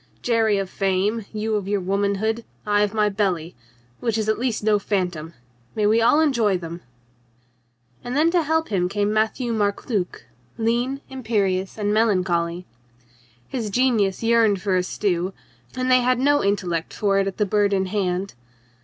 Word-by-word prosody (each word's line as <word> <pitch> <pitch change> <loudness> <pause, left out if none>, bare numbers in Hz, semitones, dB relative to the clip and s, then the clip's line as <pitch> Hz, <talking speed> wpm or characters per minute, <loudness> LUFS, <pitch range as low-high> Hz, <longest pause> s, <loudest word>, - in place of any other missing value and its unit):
"Jerry 225 -3 +2
of 195 -1 -2
fame, 195 +3 -1
you 215 0 -2
of 205 -2 -1
your 205 0 0
womanhood, 200 +4 -1 0.2
I 205 0 +2
of 205 -1 +1
my 210 -1 +3
belly 190 -5 -1 0.2
— 120 0 -35
which 230 -2 -1
is 215 -1 -1
at 215 - +1
least 240 -4 -1
no 210 -1 +3
phantom. 180 -5 -2 0.4
May 215 - +1
we 220 +2 +4
all 240 +6 +4
enjoy 235 -11 +2
them 170 0 -8 0.6
!" 120 0 -40
And 245 +3 -3
then 320 +3 +4
to 350 -1 +3
help 320 +1 0
him 180 -3 0
came 205 +1 0
Matthieu 220 +3 0
Marc 205 -2 -1
Luc, 200 -7 -2 0.3
lean, 240 +4 0
imperious 205 -7 -1
and 210 -1 0
melancholy. 180 -5 +1 0.8
His 230 -5 -3
genius 220 -4 +1
yearned 225 -3 +3
for 190 0 0
a 180 - +3
stew, 180 0 -1 0.4
and 255 0 0
they 255 0 +6
had 250 +1 +2
no 290 +3 +3
intellect 180 -5 -1
for 200 -2 +1
it 195 - +1
at 195 - -4
the 210 - +2
Bird 205 0 +2
in 190 -1 +1
Hand. 190 -1 -2
205 Hz, 175 wpm, -23 LUFS, 185-230 Hz, 0.8 s, they